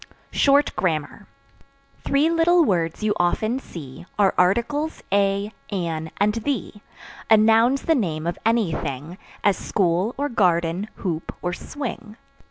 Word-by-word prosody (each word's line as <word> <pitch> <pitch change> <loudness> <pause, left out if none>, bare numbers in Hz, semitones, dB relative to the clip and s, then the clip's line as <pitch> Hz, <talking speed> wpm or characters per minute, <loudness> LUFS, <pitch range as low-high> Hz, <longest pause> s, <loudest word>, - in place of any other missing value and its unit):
Short 285 +1 +3
Grammar. 160 -5 -2 0.8
Three 280 +3 +2
little 335 0 +4
words 170 - -1
you 215 -1 +2
often 215 +8 +1
see 145 - -10
Are 200 -2 +3
Articles, 235 - +1
a, 200 +1 +1 0.2
an, 165 -5 -3
and 210 +1 +2
the. 245 +4 -3 0.6
A 220 - +7
Noun's 225 +5 +4
the 325 - +3
name 165 - -1
of 170 - -3
any 225 -5 +2
thing, 155 +4 -5 0.2
As 200 -2 +3
school, 185 +4 0
or 285 +1 0
garden, 180 - +1
hoop, 165 -4 -4
or 175 0 -1
swing. 235 -4 -6
200 Hz, 135 wpm, -23 LUFS, 170-240 Hz, 0.8 s, A